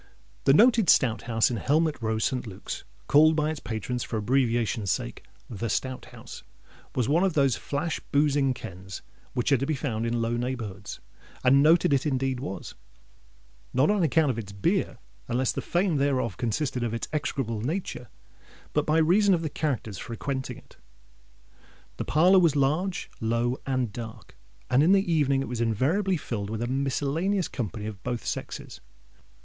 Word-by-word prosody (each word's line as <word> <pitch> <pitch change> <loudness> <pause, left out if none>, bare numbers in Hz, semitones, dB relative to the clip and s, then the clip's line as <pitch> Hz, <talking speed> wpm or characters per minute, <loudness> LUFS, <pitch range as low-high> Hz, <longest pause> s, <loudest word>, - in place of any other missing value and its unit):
The 135 - +6
Noted 230 -2 +5
Stout 115 -8 +4
House 115 +1 +3
in 120 - -2
Helmet 150 +4 +1
Row, 110 -1 0
St. 125 +2 -1
Luke's—called 150 +9 +1
by 155 0 +1
its 155 - -5
patrons, 120 +2 -4
for 115 - -3
abbreviation's 115 -2 +1
sake, - - -2 0.2
the 115 0 -4
Stout 130 +2 -2
House—was 125 -3 -8
one 165 +6 +3
of 190 -3 +2
those 140 -5 +3
flash 145 +6 -3
boozing 140 -2 +2
kens 95 -4 -9 0.3
which 125 +3 0
are 135 - +4
to 135 - -1
be 155 - 0
found 115 -5 -2
in 120 0 -1
low 115 +1 0
neighbourhoods. 115 -5 -5 0.4
And 135 +2 +6
noted 160 0 +5
it 140 +2 +1
indeed 130 -2 0
was—not 125 - -5
on 210 -2 +1
account 160 -2 +3
of 115 - -4
its 100 -3 -7
beer, 100 0 0 0.3
unless 125 +1 +1
the - - -3
fame 175 -2 +1
thereof 135 -7 0
consisted 125 +2 -2
in 115 -1 -1
its 115 - -4
execrable 130 -7 -2
nature—but 150 - -5
by 155 +1 +3
reason 185 +5 +4
of 165 - -3
the 155 - -3
characters 125 - -2
frequenting 130 +3 -4
it. - - -18 1.2
The - - -3
parlour 180 +6 +5
was 165 -5 +3
large, 155 +7 0
low, 115 +3 0
and 130 -5 -1
dark; 115 0 -9 0.3
and 130 +2 +3
in 170 +6 +5
the 195 -3 +2
evening 140 -3 +2
it - - -6
was 120 -1 -3
invariably 155 - +1
filled 105 -8 -4
with 110 +1 -3
a - - -1
miscellaneous 145 +8 0
company 110 -3 -5
of 105 -2 -6
both 120 -2 -4
sexes. - - -5
130 Hz, 165 wpm, -27 LUFS, 115-155 Hz, 1.2 s, The